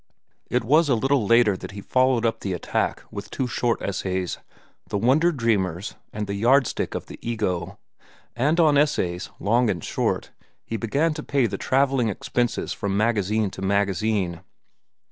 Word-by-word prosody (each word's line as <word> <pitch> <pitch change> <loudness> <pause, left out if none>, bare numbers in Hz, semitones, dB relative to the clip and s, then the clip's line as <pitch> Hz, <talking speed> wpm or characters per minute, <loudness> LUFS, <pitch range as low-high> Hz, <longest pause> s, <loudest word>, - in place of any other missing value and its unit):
It - - +1
was 150 +6 +4
a 130 - +4
little 135 -1 +1
later 115 -3 +5
that 95 - -8
he 100 - -7
followed 130 0 +2
up 115 - 0
the 95 - -3
attack 90 - -2
with - - -7
two 130 - -2
short 120 -1 0
essays, 95 -2 -2 0.5
"The - - -1
Wonder 135 +11 +3
Dreamers" 105 - -1 0.2
and 105 0 -3
"The 100 - -4
Yardstick 120 +5 +2
of - - -4
the - - -11
Ego." 100 -7 -2 0.6
And 145 +8 +1
on 150 -4 +5
essays, 90 -12 0
long 115 +3 +2
and 85 -5 -2
short, - - -1 0.3
he 115 - -4
began 140 +9 0
to 150 - -5
pay 140 -4 +1
the 100 -3 -3
travelling 135 -3 +2
expenses 120 +4 -1
from 100 -1 -2
magazine 105 -2 +1
to - - -9
magazine. 100 -2 0
115 Hz, 165 wpm, -24 LUFS, 100-130 Hz, 0.6 s, later